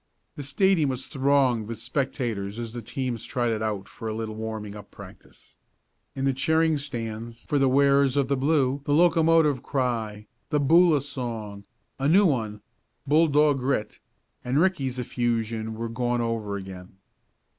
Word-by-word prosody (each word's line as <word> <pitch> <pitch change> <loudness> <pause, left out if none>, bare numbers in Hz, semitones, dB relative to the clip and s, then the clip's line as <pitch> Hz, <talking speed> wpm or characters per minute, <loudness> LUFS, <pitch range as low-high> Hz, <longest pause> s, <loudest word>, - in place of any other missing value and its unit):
The - - -6
stadium 155 +2 +2
was 130 0 -3
thronged 135 -5 +1
with 115 0 -5
spectators 120 -4 -3
as 115 -1 -5
the 120 - -5
teams 120 0 -4
trotted 120 -4 -1
out 105 -3 -3
for 115 - -8
a 110 - -3
little 110 -1 -4
warming 110 -1 -5
up 105 -1 -11
practice. - - -14 0.6
In 135 - -2
the 135 - +2
cheering 160 +3 +2
stands 115 -4 -6
for 145 - 0
the 135 -1 +3
wearers 140 0 +3
of 140 -2 +2
the 140 - +1
blue 140 -1 +1
the 145 - +2
locomotive 165 -4 +4
cry, 115 -6 -2 0.2
the 150 - +1
Boola 160 0 +4
song, 115 -7 -6 0.3
a 135 - +1
new 195 +7 +5
one 110 - -1 0.4
"Bulldog 150 -1 +3
Grit!" 125 -5 -2 0.4
and 125 +3 -1
Ricky's 145 -8 +1
effusion 115 -2 -2
were 115 +1 -4
gone 120 +1 -1
over 110 -3 -2
again. 95 -1 -10
125 Hz, 155 wpm, -25 LUFS, 110-140 Hz, 0.6 s, new